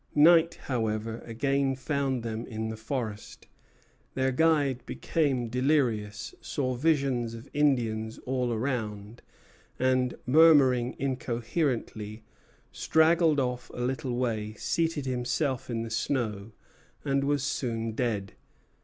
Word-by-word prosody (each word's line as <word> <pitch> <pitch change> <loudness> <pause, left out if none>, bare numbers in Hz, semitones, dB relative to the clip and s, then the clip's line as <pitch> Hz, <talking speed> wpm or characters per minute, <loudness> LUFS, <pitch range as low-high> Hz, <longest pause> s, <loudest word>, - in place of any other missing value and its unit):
Night, 165 +2 +6
however, 115 -2 -2
again 135 +3 0
found 135 -2 -1
them 115 0 -4
in 110 -1 -4
the 110 - -4
forest. 110 -2 -5 0.7
Their 130 0 +1
guide 145 -3 +2
became 135 -7 0
delirious, 115 -4 0
saw 130 -3 -2
visions 130 -4 +1
of 115 - -10
Indians 115 -7 +1
all 125 -1 0
around, 110 -3 -3 0.6
and, 130 -1 +1
murmuring 135 -4 +5
incoherently, 120 -4 -2 0.5
straggled 160 -1 +3
off 125 -1 -2
a - - -4
little 130 0 -2
way, 110 -4 -2
seated 165 +3 -1
himself 130 +2 -1
in 115 -1 -2
the 115 - -7
snow, 115 -4 -2 0.5
and 140 -1 +1
was 140 -1 +1
soon 115 -5 -2
dead. 110 -4 -2
125 Hz, 110 wpm, -28 LUFS, 115-140 Hz, 0.7 s, Night